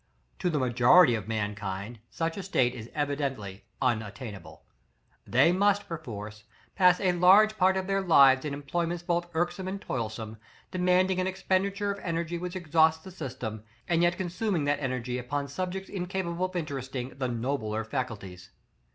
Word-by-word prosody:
To 180 - 0
the 155 - 0
majority 125 +4 +5
of 110 -3 -3
mankind, 105 0 -4
such 165 0 -2
a 200 - -4
state 130 -10 +1
is 115 -1 -9
evidently 140 -9 -3 0.2
unattainable. 110 -4 -3 0.6
They 130 +7 +4
must, 205 +2 +2
perforce, 110 - -7 0.3
pass 180 -2 +5
a 185 -2 +2
large 190 +5 +6
part 190 -1 +3
of 190 - -2
their 195 0 0
lives 135 -7 +6
in 150 - -3
employments 165 +5 -3
both 175 0 -1
irksome 175 +3 -1
and 195 +1 -3
toilsome, 110 - -4 0.3
demanding 185 0 +2
an 185 - 0
expenditure 195 +2 0
of 200 - -5
energy 170 -1 -3
which 180 +1 -5
exhausts 160 -2 +2
the 190 - -10
system, 125 - -6 0.2
and 170 -1 +2
yet 175 0 +2
consuming 185 -1 -1
that 145 0 +1
energy 125 -2 -2
upon 140 +3 -3
subjects 185 +6 -4
incapable 180 -2 -2
of 185 0 -7
interesting 135 -6 -4
the 130 - 0
nobler 115 -3 -2
faculties. 110 -7 -5
160 Hz, 155 wpm, -28 LUFS, 120-180 Hz, 0.6 s, large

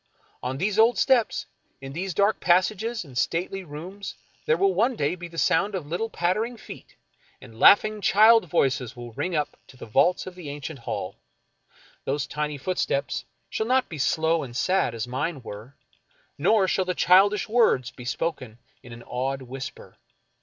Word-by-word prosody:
On 130 +1 -3
these 200 +6 0
old 230 +2 +5
steps, 255 -5 +2 0.3
in 135 0 -8
these 180 +2 -4
dark 205 +2 +2
pas 180 +1 +4
sages 220 0 -4
and 135 -4 -14
stately 180 +8 -1
rooms, 180 +6 -8 0.3
there 155 - +3
will 195 +1 +3
one 235 +7 +2
day 145 -4 0
be 175 -1 -7
the 165 -1 -13
sound 195 +5 +2
of 175 -6 -4
little 175 +9 -3
pattering 215 +8 -1
feet, - - -12 0.4
and 110 0 -14
laughing 215 +1 +6
child 220 +3 +6
voices 130 -3 0
will 120 -1 -9
ring 175 +10 -3
up 150 -1 -1
to 130 - -16
the - - -9
vaults 140 +11 +2
of 185 - -8
the 175 -5 -9
ancient 145 0 -7
hall. 100 -4 -5 0.9
Those 140 +1 -1
tiny 150 -1 -3
footsteps 140 -2 -2 0.2
shall 220 - -3
not 255 +1 +2
be 155 - -7
slow 160 +3 +1
and 120 -3 -6
sad 185 -9 +1
as 115 +1 -4
mine 135 +2 -3
were, 110 +5 -9 0.6
nor 210 -4 +3
shall 190 0 +1
the 180 0 -2
childish 195 +4 +4
words 215 - +2
be 125 - -11
spoken 125 -3 -3 0.2
in 120 - -12
an 120 0 -11
awed 135 +2 -3
whisper. 135 +2 -9
165 Hz, 175 wpm, -25 LUFS, 135-200 Hz, 0.9 s, laughing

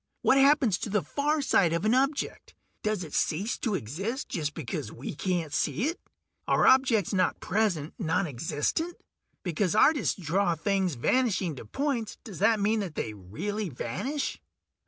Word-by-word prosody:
What 275 - +5
happens 270 -8 +4
to - - -4
the 210 -1 +1
far 295 +1 0
side 175 -10 +3
of 170 +4 -1
an 220 - +4
object; 275 +2 -1 0.3
does 215 -3 -1
it 155 - -9
cease 195 +9 0
to 220 -5 0
exist 190 - -4
just 150 -6 -2
because 120 -8 -4
we 125 - -6
can't 170 -2 -2
see 145 - 0
it? 325 +6 -1 0.5
Are - - +3
objects 260 -8 +4
not 185 -2 +1
present 185 -7 0
nonexistent? 165 - -1 0.5
Because 180 +2 0
artists 290 -1 +3
draw 175 +2 +1
things 190 -1 0
vanishing 185 - +1
to - - -8
points, 270 -6 -2
does 210 -9 -9
that 215 +2 +4
mean 215 +2 +2
that 185 -7 -4
they 110 - -3
really 175 - -4
vanish?" 200 - -3
195 Hz, 155 wpm, -28 LUFS, 160-235 Hz, 0.5 s, What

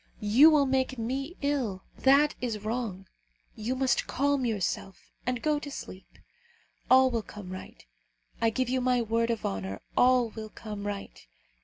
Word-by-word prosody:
You 230 +9 +7
will 300 -3 +4
make 260 -1 0
me 270 +9 -3
ill. 250 -10 -1 0.2
That 280 +3 +5
is 215 -4 -3
wrong. 215 -5 -3 0.5
You 230 +4 -2
must 260 -1 +1
calm 280 -1 +1
yourself, 195 -3 -3 0.2
and 250 -2 -1
go 300 -1 +2
to 290 - -7
sleep. 190 -8 -10 0.7
All 260 0 +6
will 230 -2 0
come 205 -3 -10
right. 185 - -9 0.6
I 230 - +4
give 255 +3 -1
you 255 +1 0
my 250 -1 +2
word 230 +1 0
of 230 -2 -2
honour, 95 0 -3 0.2
all 250 -2 +4
will 220 -1 -7
come 210 -2 -7
right. 200 - -7
240 Hz, 160 wpm, -28 LUFS, 210-265 Hz, 0.7 s, You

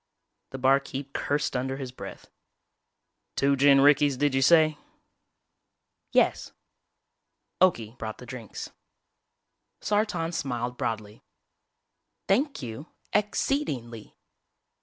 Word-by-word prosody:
The 135 - -7
barkeep 135 +1 +1
cursed 145 -1 -1
under 130 +1 -2
his 130 -3 -6
breath. 130 - -10 1.0
"Two 140 0 +3
gin 140 0 +6
rickeys, 145 -1 +4
did 145 0 +1
you 135 - +2
say?" 155 +1 +5 1.3
"Yes." - - +2 1.1
Okie 120 -12 +2
brought 110 -1 -5
the 125 - -11
drinks. 120 -3 -8 1.1
Sartan 205 -5 0
smiled 125 -6 -3
broadly. 110 -3 -4 1.1
"Thank 265 - +1
you 120 +6 -7 0.3
ex 210 0 +1
ceed 285 +2 0
ing 120 -3 -5
ly." 110 -2 -11
135 Hz, 105 wpm, -27 LUFS, 125-155 Hz, 1.3 s, gin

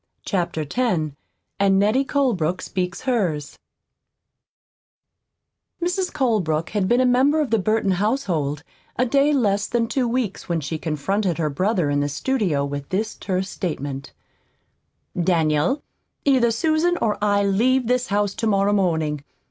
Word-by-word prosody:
CHAPTER 175 -5 -1
X 180 - 0 0.5
AND 195 -1 +4
NETTIE 215 +7 +3
COLEBROOK 195 - 0
SPEAKS 180 -1 -3
HERS 185 - -1 2.2
Mrs. 360 +1 -1
Colebrook 185 - 0
had 205 -3 0
been 240 +4 +3
a - - +3
member 265 +5 +3
of 295 -6 -1
the 225 - +3
Burton 215 0 +1
household 180 - -1 0.3
a 250 - +2
day 275 +4 +3
less 210 -7 +1
than 235 -1 +1
two 250 +2 0
weeks 230 -6 -2
when 170 -1 +1
she 155 +2 -4
confronted 175 +4 -1
her 155 -3 -1
brother 180 0 0
in 145 - +1
the 145 0 0
studio 165 - 0
with 140 0 -5
this 215 +4 -1
terse 190 0 -3
statement: 140 -6 -4 1.1
"Daniel, 165 - +1 0.4
either 260 -4 +4
Susan 315 +8 +1
or 210 -2 -1
I 205 -1 +3
leave 240 +6 +2
this 250 +1 +1
house 205 0 0
tomorrow 205 -2 +1
morning. 160 -7 0
200 Hz, 140 wpm, -22 LUFS, 165-245 Hz, 2.2 s, AND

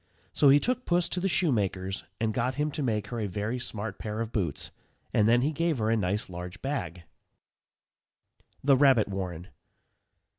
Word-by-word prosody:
So 145 - +5
he 140 +2 +7
took 250 - -1
Puss 175 0 +2
to 180 - -1
the 190 - 0
shoemaker's, 100 - 0 0.2
and 110 -1 0
got 125 +3 0
him 150 +2 0
to 150 - -4
make 105 -5 -1
her 120 - -4
a 105 - -1
very 105 +6 -3
smart 105 -4 -5
pair 105 0 -4
of 115 0 -3
boots, 85 -9 -2 0.4
and 105 +1 +4
then 120 +1 +4
he 150 - +1
gave 165 0 0
her 110 -1 +1
a - - +4
nice 100 0 -1
large 90 +1 -7
bag. 90 - -3 1.6
_THE 135 -2 +5
RABBIT 130 -7 +5
WARREN. 90 -2 -5
110 Hz, 180 wpm, -28 LUFS, 100-140 Hz, 1.6 s, he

